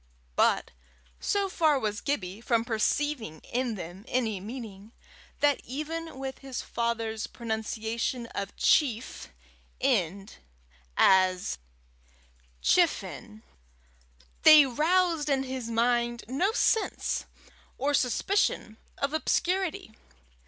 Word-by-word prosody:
But - - +2 0.5
so 400 -1 0
far 315 -6 +2
was 210 -4 -2
Gibbie 205 -7 -3
from 230 -1 +1
perceiving 235 - -1
in 245 -2 -2
them 180 +1 -8
any 225 -6 0
meaning, 215 -1 -9 0.5
that 290 -2 +3
even 315 +3 -5
with 265 0 -5
his 265 -2 -5
father's 230 -2 -2
pronunciation 225 +1 -3
of 200 0 -4
chief 250 -6 +1 0.5
end 200 -7 0 0.6
as 185 - +4 1.0
chifenn, 105 - +1 1.0
they 305 -2 +9
roused 325 +3 +1
in 270 -1 +2
his 260 -3 -5
mind 235 +1 +1
no 285 - +1
sense 445 -1 +1 0.5
or 285 +3 0
suspicion 255 - +1 0.2
of 280 +2 -1
obscurity. 365 - 0
245 Hz, 95 wpm, -28 LUFS, 220-290 Hz, 1.0 s, they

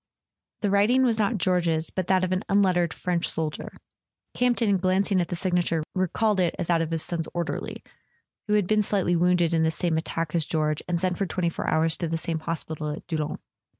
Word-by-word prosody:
The 205 -3 0
writing 215 +6 +4
was 230 -3 +2
not 215 +2 +1
George's, 170 -4 +1
but 185 -2 -3
that 185 -1 +3
of 185 - -1
an 185 0 +1
un¬ 200 0 +4
lettered 175 -3 +1
French 175 -2 -1
soldier. 155 -2 -3 0.6
Campton, 235 -5 +2
glancing 185 +1 +2
at 170 - -2
the 175 - -3
signature, 175 -3 0
recalled 195 +3 +1
it 175 -2 +1
as - - -2
that 170 -1 +3
of 165 - -2
his 165 -1 -1
son's 165 -2 -3
orderly, 170 -1 -4 0.6
who 210 - +1
had 205 -3 +3
been 215 +3 +2
slightly 195 -4 +1
wounded 175 -1 +2
in 165 - +2
the 160 - +3
same 160 0 0
attack 165 -1 -3
as 170 -2 +2
George, 155 -1 -1
and 175 -1 0
sent 180 0 -1
for 195 - 0
twenty 170 0 -1
four - - -3
hours 160 +1 +1
to 170 - -2
the 165 +1 -1
same 165 -1 -2
hospital 160 -1 -4
at 150 - -6
Doullens. 155 -3 -3
175 Hz, 215 wpm, -26 LUFS, 165-195 Hz, 0.6 s, writing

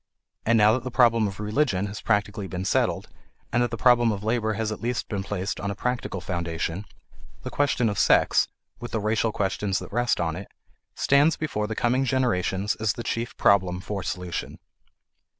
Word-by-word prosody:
And 115 0 +5
now 105 0 +6
that 125 0 -1
the 130 - -4
problem 115 -3 +4
of 95 0 -7
religion 105 -2 0
has 105 0 -6
practically 105 0 0
been 95 0 -4
settled, - - +1 0.5
and 120 - +3
that 120 - +1
the 115 - -4
problem 120 -2 +4
of 100 -1 -4
labor 110 0 0
has 110 +1 -2
at 110 - -6
least 120 +1 -2
been 100 -3 -2
placed 100 0 -3
on 100 - -3
a 100 - -3
practical 125 -3 -2
foundation, 85 +1 -3 0.6
the - - -5
question 140 -4 +1
of 100 -2 -1
sex - - +4 0.3
with 120 - -8
the 110 - +1
racial 110 +2 +1
questions 100 -1 -1
that - - -7
rest 120 +1 +1
on 80 -2 -1
it 100 +3 -7 0.5
stands 145 +4 +3
before 105 -9 -2
the 110 - -4
coming 125 +4 +1
generations 105 -7 0
as 110 -1 0
the 120 - -6
chief 115 0 -3
problem 95 -3 +3
for 100 +1 -4
solution. 90 -2 -4
105 Hz, 190 wpm, -25 LUFS, 95-120 Hz, 0.6 s, now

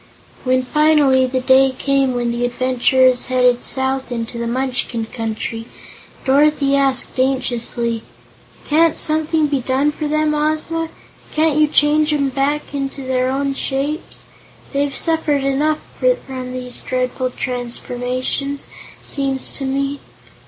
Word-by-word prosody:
When, 255 0 +2
finally, 290 -3 +4
the 255 0 -1
day 260 0 +4
came 275 -2 +1
when 240 -1 0
the 240 +1 -2
adventurers 255 +1 +2
headed 250 -1 +3
south 265 -1 -1
into 235 0 -4
the 235 - -2
Munchkin 250 -2 -2
Country, 225 0 -4 0.6
Dorothy 280 0 +3
asked 270 -2 +1
anxiously: 240 -3 0 0.7
"Can't 325 +1 +3
something 310 0 +1
be 285 -2 0
done 265 +4 +1
for 300 0 -4
them, 305 0 +1
Ozma? 310 +2 -1 0.5
Can't 310 -1 +3
you 305 - +5
change 300 +1 +3
'em 280 -2 +1
back 280 +3 -1
into 275 -1 -3
their 255 0 0
own 275 +1 -1
shapes? 275 +4 -3 0.5
They've 280 0 0
suffered 320 -4 +1
enough 295 +3 +1 0.4
from 255 -2 -6
these 250 -1 -4
dreadful 255 0 -2
transformations, 250 +2 -3 0.4
seems 270 -2 -1
to 275 - -4
me." 275 +1 -1
270 Hz, 125 wpm, -19 LUFS, 255-295 Hz, 0.7 s, you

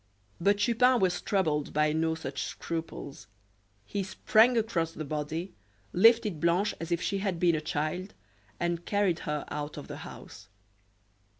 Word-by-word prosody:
But 200 +4 +3
Chupin 240 +4 +4
was 180 -3 +1
troubled 155 -7 0
by 150 0 +2
no 160 0 +1
such 135 -4 -5
scruples. 165 -7 -5 0.6
He 200 - -3
sprang 220 +5 +3
across 175 -8 0
the 155 - -5
body, 155 +5 -4 0.4
lifted 215 -3 +5
Blanche 170 +6 +2
as 165 +1 -6
if 170 - +2
she 195 +4 -1
had 190 -4 -2
been 175 -1 +4
a 155 - 0
child 160 +4 -3 0.4
and 170 0 -1
carried 200 -4 +1
her 150 -1 -2
out 150 0 -5
of - - -7
the - - -7
house. - - -11
170 Hz, 155 wpm, -29 LUFS, 155-200 Hz, 0.6 s, lifted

